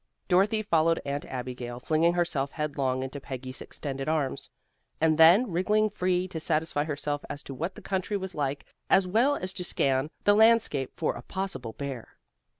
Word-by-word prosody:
Dorothy 200 Hz, +4 st, +3 dB
followed 165 Hz, -4 st, +2 dB
Aunt 140 Hz, +1 st, -3 dB
Abigail, 125 Hz, -1 st, -5 dB
flinging 160 Hz, +5 st, +2 dB
herself 170 Hz, -6 st, 0 dB
headlong 140 Hz, -4 st, -1 dB
into 135 Hz, +2 st, -6 dB
Peggy's 130 Hz, -1 st, -7 dB
extended 135 Hz, 0 st, -5 dB
arms, 150 Hz, -4 st, -1 dB, 0.5 s
and 160 Hz, 0 st, +3 dB
then 180 Hz, +8 st, +7 dB
wriggling 210 Hz, +5 st, +2 dB
free 185 Hz, -2 st, 0 dB
to 160 Hz, -, -5 dB
satisfy 155 Hz, -2 st, 0 dB
herself 145 Hz, -1 st, -3 dB
as 145 Hz, -1 st, -6 dB
to 135 Hz, -, -7 dB
what 165 Hz, +8 st, -4 dB
the -, -, -12 dB
country 195 Hz, +2 st, -1 dB
was 190 Hz, -1 st, -5 dB
like, 140 Hz, -1 st, -2 dB, 0.2 s
as 195 Hz, -1 st, +5 dB
well 235 Hz, +10 st, +3 dB
as 185 Hz, -7 st, -5 dB
to 180 Hz, -, -4 dB
scan 135 Hz, -4 st, 0 dB
the 205 Hz, -, +5 dB
landscape 220 Hz, -, +4 dB
for -, -, 0 dB
a -, -, -8 dB
possible 190 Hz, -, -4 dB
bear. 135 Hz, -4 st, -7 dB
160 Hz, 170 wpm, -28 LUFS, 135-185 Hz, 0.5 s, then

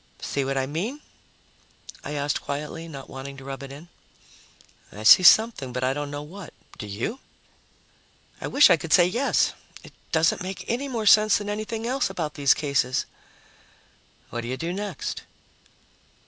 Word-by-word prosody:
"See 140 Hz, -, -2 dB
what 135 Hz, 0 st, -2 dB
I 135 Hz, -, +1 dB
mean?" 185 Hz, -, -4 dB, 1.0 s
I 150 Hz, -, -5 dB
asked 145 Hz, 0 st, -1 dB
quietly, 150 Hz, +3 st, -5 dB
not 140 Hz, -4 st, -9 dB
wanting 135 Hz, +1 st, -8 dB
to 135 Hz, -, -11 dB
rub 135 Hz, 0 st, -7 dB
it 135 Hz, -1 st, -8 dB
in. 145 Hz, +5 st, -11 dB, 1.0 s
"I 105 Hz, -, -9 dB
see 110 Hz, -, +9 dB
something, 200 Hz, -, +5 dB
but 125 Hz, +1 st, -3 dB
I 130 Hz, +1 st, +1 dB
don't 145 Hz, 0 st, -4 dB
know 145 Hz, 0 st, -6 dB
what. 180 Hz, +3 st, -11 dB, 0.2 s
Do 105 Hz, -, -6 dB
you?" 115 Hz, -, -4 dB, 1.2 s
"I -, -, -3 dB
wish 290 Hz, -, +6 dB
I -, -, +6 dB
could 155 Hz, 0 st, -3 dB
say 175 Hz, -, +7 dB
yes. 240 Hz, +10 st, +1 dB, 0.3 s
It -, -, -14 dB, 0.2 s
doesn't 160 Hz, 0 st, +2 dB
make 185 Hz, +1 st, -6 dB
any 250 Hz, +5 st, -2 dB
more 235 Hz, -5 st, -3 dB
sense 215 Hz, 0 st, +6 dB
than 205 Hz, 0 st, -5 dB
anything 215 Hz, +2 st, -4 dB
else 255 Hz, -2 st, 0 dB
about 165 Hz, -6 st, -4 dB
these 140 Hz, -2 st, +3 dB
cases." 140 Hz, -3 st, 0 dB, 1.3 s
"What 120 Hz, -, -3 dB
do 120 Hz, -, -7 dB
you 130 Hz, +2 st, -3 dB
do 165 Hz, +5 st, -3 dB
next?" 200 Hz, -4 st, -5 dB
155 Hz, 170 wpm, -25 LUFS, 135-205 Hz, 1.3 s, see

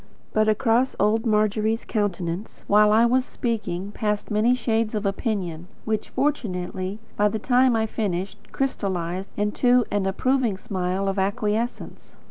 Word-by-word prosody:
But 215 Hz, 0 st, +3 dB
across 230 Hz, +4 st, +2 dB
old 220 Hz, +3 st, +2 dB
Margery's 215 Hz, +1 st, +1 dB
countenance, 190 Hz, -3 st, -3 dB
while 210 Hz, +1 st, +5 dB
I 225 Hz, +2 st, +5 dB
was 255 Hz, +2 st, +3 dB
speaking, 205 Hz, -7 st, -3 dB
passed 210 Hz, 0 st, -2 dB
many 220 Hz, +4 st, +3 dB
shades 225 Hz, -2 st, 0 dB
of 210 Hz, 0 st, -2 dB
opinion, 195 Hz, -5 st, -2 dB, 0.2 s
which, 220 Hz, -1 st, -2 dB
fortunately, 190 Hz, -8 st, -2 dB, 0.2 s
by 210 Hz, -, +3 dB
the 220 Hz, -, -2 dB
time 250 Hz, +2 st, +3 dB
I 225 Hz, -, +2 dB
had 220 Hz, -, -1 dB
finished, 195 Hz, -1 st, -3 dB
crystallized 190 Hz, -8 st, -2 dB
into 245 Hz, +4 st, +3 dB
an 205 Hz, -2 st, 0 dB
approving 240 Hz, +1 st, +1 dB
smile 190 Hz, 0 st, -2 dB
of 195 Hz, 0 st, -1 dB
acquiescence. 210 Hz, +4 st, -2 dB
210 Hz, 140 wpm, -24 LUFS, 195-230 Hz, 0.2 s, while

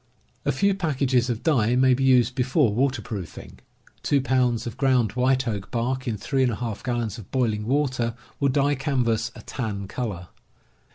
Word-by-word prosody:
A -, -, +2 dB
few 200 Hz, 0 st, +2 dB
packages 135 Hz, -8 st, +1 dB
of 115 Hz, -2 st, -3 dB
dye 125 Hz, -7 st, +2 dB
may 130 Hz, 0 st, +5 dB
be 130 Hz, +2 st, 0 dB
used 125 Hz, -2 st, +4 dB
be 125 Hz, -, -1 dB
fore 125 Hz, -2 st, +2 dB
waterproofing. 115 Hz, -, -3 dB, 0.4 s
Two 140 Hz, -, +2 dB
pounds 125 Hz, -3 st, +1 dB
of 120 Hz, -, -5 dB
ground 130 Hz, -6 st, +2 dB
white 130 Hz, +2 st, +1 dB
oak 100 Hz, -4 st, -3 dB
bark 130 Hz, +3 st, -2 dB
in 110 Hz, -3 st, -1 dB
3J 120 Hz, -1 st, -1 dB
gallons 120 Hz, -4 st, -2 dB
of 105 Hz, -, -12 dB
boiling 110 Hz, -5 st, 0 dB
water 130 Hz, -4 st, 0 dB, 0.2 s
will 140 Hz, -, +2 dB
dye 140 Hz, +2 st, +2 dB
canvas 120 Hz, -5 st, 0 dB
a -, -, -11 dB
tan 105 Hz, -6 st, -4 dB
color. 95 Hz, -6 st, -5 dB
125 Hz, 165 wpm, -24 LUFS, 115-135 Hz, 0.4 s, may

